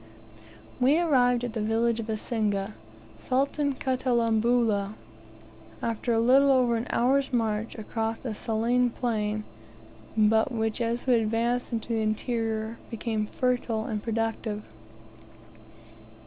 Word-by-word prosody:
We 265 +5 +4
arrived 245 -7 +3
at 240 -2 -3
the 225 - -2
village 225 +2 +1
of 225 - -4
Isinga, 215 -2 -1 0.5
Sultan 280 +2 0
Katalambula, 235 -5 +1 0.8
after 230 +1 -2
a 225 - +3
little 265 +4 +5
over 250 -3 +3
an 230 +2 -2
hour's 270 +3 +2
march 225 -2 -1
across 225 +1 -3
a 230 - -2
saline 235 +3 +1
plain, 215 -3 -2 0.7
but 220 +3 +4
which 225 0 -1
as 235 +1 -1
we 255 - +4
advanced 235 +2 +1
into 230 0 -3
the 225 -1 0
interior 220 0 -2
became 220 -2 -2
fertile 245 -3 -1
and 215 -2 -3
productive. 225 -1 -2
230 Hz, 120 wpm, -27 LUFS, 220-245 Hz, 0.8 s, little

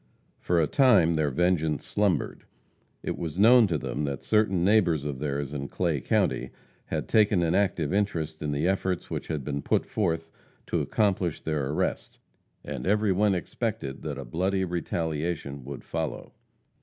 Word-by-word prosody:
For 85 -1 +1
a 80 - +4
time 100 - +4
their 80 -2 +1
vengeance 80 0 +1
slumbered. 100 -7 0 0.6
It - - -3
was 85 -1 -4
known 115 +2 +7
to 85 -4 0
them 75 - -3
that 70 -2 -4
certain 105 -5 +2
neighbors 85 -8 +3
of 70 -3 -4
theirs 70 -1 -3
in 70 -1 -4
Clay 85 -5 -1
county 65 +1 0 0.4
had - - -3
taken 105 -4 +3
an 85 0 +1
active 90 -5 +1
interest 80 -6 -1
in 75 - -2
the 75 +4 0
efforts 95 -1 -1
which - - -4
had 75 -4 -3
been 70 +1 -3
put - - +1
forth 80 -5 -1 0.3
to - - -1
accomplish 95 -6 0
their 75 -4 -1
arrest, 75 - -2 0.5
and - - -5
every 105 0 +3
one 100 +1 +3
expected 70 -5 -4
that - - -4
a 70 - -6
bloody 95 +9 0
retaliation 80 -4 -3
would 70 0 -7
follow. - - -4
85 Hz, 165 wpm, -27 LUFS, 75-95 Hz, 0.6 s, known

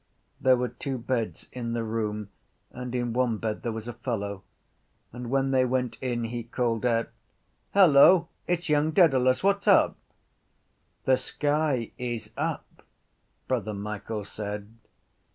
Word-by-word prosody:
There 130 -1 +4
were 125 0 -1
two 130 +3 -4
beds 115 -1 -3
in 120 -2 -4
the 115 -1 -1
room 105 -2 -3 0.4
and 125 0 -6
in 120 -2 -1
one 120 -2 +1
bed 110 0 -3
there 115 - -2
was 110 0 -6
a 120 - -4
fellow: 100 -5 -4 0.7
and 120 0 -6
when 135 +1 +1
they 130 -1 +4
went 125 -1 -1
in 120 -2 -1
he 120 +1 -3
called 115 0 -1
out: 115 -1 +1 0.7
—Hello! 170 -1 +7 0.2
It’s 175 -1 -1
young 150 0 +3
Dedalus! 130 -7 +4
What’s 200 0 +2
up? - - +5 1.1
—The 130 -1 +4
sky 145 -6 -1
is 120 -2 -4
up, - - -4 0.7
Brother 105 -1 -1
Michael 105 +1 -5
said. 105 +1 -6
120 Hz, 140 wpm, -27 LUFS, 115-130 Hz, 1.1 s, Hello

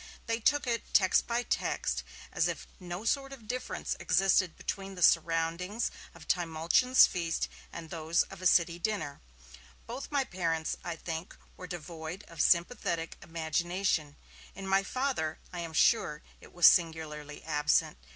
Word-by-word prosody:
They 230 0 -1
took 290 +5 +2
it, 235 -2 -3
text 190 -2 +4
by 235 +1 0
text, - - -1 0.3
as - - +2
if - - -4
no 180 +3 -6
sort 270 +3 0
of 245 -6 -11
difference 255 +2 -3
existed 190 -3 +2
between 195 -1 -5
the 180 - -2
surroundings 165 +6 +2 0.2
of - - -13
Trimalchion's 175 +9 +4
feast 170 -3 -2 0.2
and 165 -2 -8
those 165 0 +1
of 195 -1 -12
a 185 - +3
City 170 -1 +3
dinner. 185 -7 -2 0.6
Both 275 - -7
my 285 -2 +2
parents, 165 -7 -2
I 175 -1 -4
think, 165 +2 -6 0.2
were 180 - -9
devoid 170 +2 -7
of 165 -2 -4
sympathetic 170 -2 +1
imagination; 165 -1 -1 0.4
in 195 - -7
my 195 0 +4
Father, 210 - -2 0.2
I 175 - -5
am 165 -1 -5
sure, 160 -4 +3 0.2
it - - -15
was 175 -1 +3
singularly 155 -3 +3
absent. 150 - +1
175 Hz, 150 wpm, -31 LUFS, 160-200 Hz, 0.6 s, text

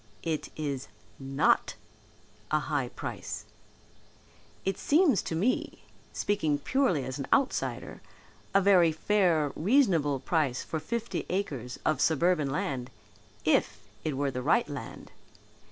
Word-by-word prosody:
"It 160 -2 -2
is 140 -4 -3 0.3
not 135 0 +2 0.7
a 155 - +3
high 145 -3 -1
price. - - -6 1.2
It 195 - -1
seems 300 - +4
to 160 - -4
me, 210 +10 -1 0.3
speaking 160 -8 0
purely 185 - +1
as 130 +2 -5
an 140 - -4
outsider, 275 -1 0 0.5
a 195 - +4
very 185 -4 +5
fair, 165 -4 +2
reasonable 170 - +3
price 145 -5 0
for 160 - -3
fifty 235 +8 -3
acres 140 - -3
of 155 -3 +1
suburban 160 -1 +2
land, 135 -3 -2 0.6
if - - +2 0.2
it 150 -4 -2
were 140 0 0
the 125 0 -4
right 200 - +3
land. 145 -2 -8
155 Hz, 120 wpm, -29 LUFS, 140-195 Hz, 1.2 s, very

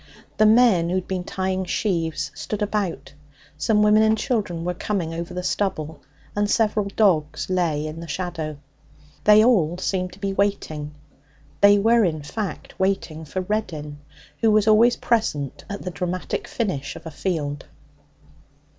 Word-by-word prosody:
The 215 - +5
men 215 -7 +5
who 180 - 0
had 185 -1 -2
been 185 -1 -2
tying 190 0 -2
sheaves 165 -7 -1
stood 210 0 -4
about, 200 -9 -2 0.4
some 210 +7 +2
women 210 +1 +5
and 220 0 +3
children 205 -10 -2
were 180 - 0
coming 175 -3 -2
over 170 +1 -5
the 180 0 -4
stubble, 160 -7 -2 0.3
and 205 0 +1
several 210 -2 +2
dogs 170 -6 +2
lay 165 -5 0
in 155 +1 -6
the 170 - -8
shadow. 165 -4 -4 0.7
They 210 +1 +7
all 175 -9 +3
seemed 185 0 -2
to 185 - -15
be 195 -1 -2
waiting. 155 -7 -2 0.7
They 205 0 +7
were, 225 +3 +4
in 155 -5 -1
fact, 205 +6 -6
waiting 190 -5 -1
for 185 +5 -3
Reddin, 170 -8 -3 0.4
who 225 - +3
was 215 0 +3
always 230 +3 +6
present 150 - -1
at 200 0 -5
the 180 - -4
dramatic 180 0 -3
finish 185 - -3
of - - -11
a 160 - -6
field. 145 -3 -3
185 Hz, 155 wpm, -23 LUFS, 160-210 Hz, 0.7 s, They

